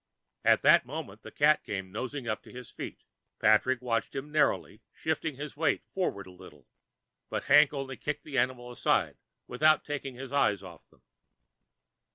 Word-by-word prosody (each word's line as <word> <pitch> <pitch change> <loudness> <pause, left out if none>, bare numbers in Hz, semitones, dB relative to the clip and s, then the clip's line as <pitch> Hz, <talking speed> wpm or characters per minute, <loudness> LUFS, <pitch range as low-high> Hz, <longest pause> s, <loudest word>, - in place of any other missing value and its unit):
At - - +4
that - - +7
moment 125 -8 -7
the 110 - -10
cat 150 +6 +3
came 95 -2 -5
nosing 130 +4 -5
up 110 -1 -2
to - - -15
his 125 -2 -10
feet. - - -8 0.4
Patrick 125 +4 +3
watched 115 -2 -1
him 140 +2 -5
narrowly, 155 0 +1
shifting 160 -1 -2
his 145 +2 -7
weight 160 +1 0
forward 140 - -3
a 95 - -12
little, 75 -6 -15 0.6
but - - -3
Hank 145 +1 +6
only 135 -2 -5
kicked 150 0 -4
the 140 -4 -1
animal 125 -1 -1
aside 120 - +1 0.3
without 155 +5 +3
taking 140 -3 -5
his 135 +1 -8
eyes 105 -8 +2
off 85 -4 -13
them. - - -28
130 Hz, 170 wpm, -29 LUFS, 110-145 Hz, 0.6 s, that